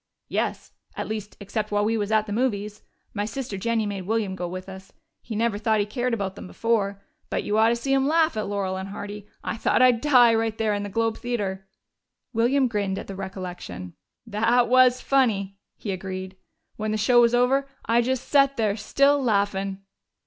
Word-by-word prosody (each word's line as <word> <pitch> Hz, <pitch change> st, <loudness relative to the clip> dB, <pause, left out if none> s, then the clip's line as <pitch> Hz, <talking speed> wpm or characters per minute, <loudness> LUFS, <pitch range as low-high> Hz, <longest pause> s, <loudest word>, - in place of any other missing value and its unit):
"Yes. -, -, -2 dB, 0.3 s
At -, -, -3 dB
least, 215 Hz, -1 st, -5 dB
except 210 Hz, +1 st, -3 dB
while 205 Hz, 0 st, +2 dB
we 225 Hz, +1 st, +1 dB
was 210 Hz, -1 st, -2 dB
at 215 Hz, -1 st, +3 dB
the 205 Hz, -, -4 dB
movies. 210 Hz, -3 st, -1 dB, 0.3 s
My 205 Hz, -, -1 dB
sister 235 Hz, -1 st, -5 dB
Jennie 225 Hz, +3 st, 0 dB
made 195 Hz, -3 st, -4 dB
William 215 Hz, -3 st, 0 dB
go 180 Hz, -1 st, -4 dB
with 185 Hz, +2 st, -7 dB
us 190 Hz, 0 st, -10 dB, 0.3 s
he 225 Hz, -, -6 dB
never 220 Hz, -1 st, 0 dB
thought 220 Hz, 0 st, +2 dB
he 205 Hz, -, +2 dB
cared 245 Hz, +4 st, -2 dB
about 195 Hz, -3 st, -3 dB
them -, -, -9 dB
before. 200 Hz, -2 st, 0 dB, 0.3 s
But -, -, -1 dB
you 205 Hz, -, -1 dB
ought 225 Hz, +1 st, +5 dB
to 235 Hz, -, +2 dB
see 270 Hz, +4 st, -1 dB
him 270 Hz, 0 st, +3 dB
laugh 320 Hz, +1 st, +3 dB
at 215 Hz, -, -2 dB
Laurel 195 Hz, -2 st, -2 dB
and 190 Hz, +1 st, -5 dB
Hardy. 205 Hz, 0 st, -7 dB, 0.2 s
I -, -, -3 dB
thought -, -, +2 dB
I'd 245 Hz, -2 st, +5 dB
die, 250 Hz, -6 st, +6 dB
right 225 Hz, -1 st, 0 dB
there 220 Hz, -1 st, +1 dB
in 205 Hz, -, -1 dB
the 205 Hz, -, -4 dB
Globe 225 Hz, +2 st, 0 dB
Theater." 195 Hz, -6 st, -3 dB, 0.7 s
William 250 Hz, +4 st, +3 dB
grinned 200 Hz, -4 st, -1 dB
at -, -, -5 dB
the 195 Hz, -, -7 dB
recollection. 180 Hz, -, -7 dB, 0.3 s
"They 210 Hz, -2 st, -5 dB
was 245 Hz, +2 st, +4 dB
funny," 200 Hz, -8 st, +1 dB, 0.2 s
he 205 Hz, -, -4 dB
agreed. 190 Hz, 0 st, -5 dB, 0.4 s
"When 215 Hz, 0 st, -2 dB
the 215 Hz, -, 0 dB
show 240 Hz, +3 st, +5 dB
was 235 Hz, 0 st, +4 dB
over, 265 Hz, +3 st, +2 dB, 0.2 s
I 235 Hz, +1 st, +3 dB
just 260 Hz, +1 st, -2 dB
set 275 Hz, -1 st, +4 dB
there, 215 Hz, -3 st, +1 dB
still 275 Hz, +6 st, +2 dB
laughin'!" 200 Hz, -4 st, 0 dB
215 Hz, 200 wpm, -25 LUFS, 200-240 Hz, 0.7 s, die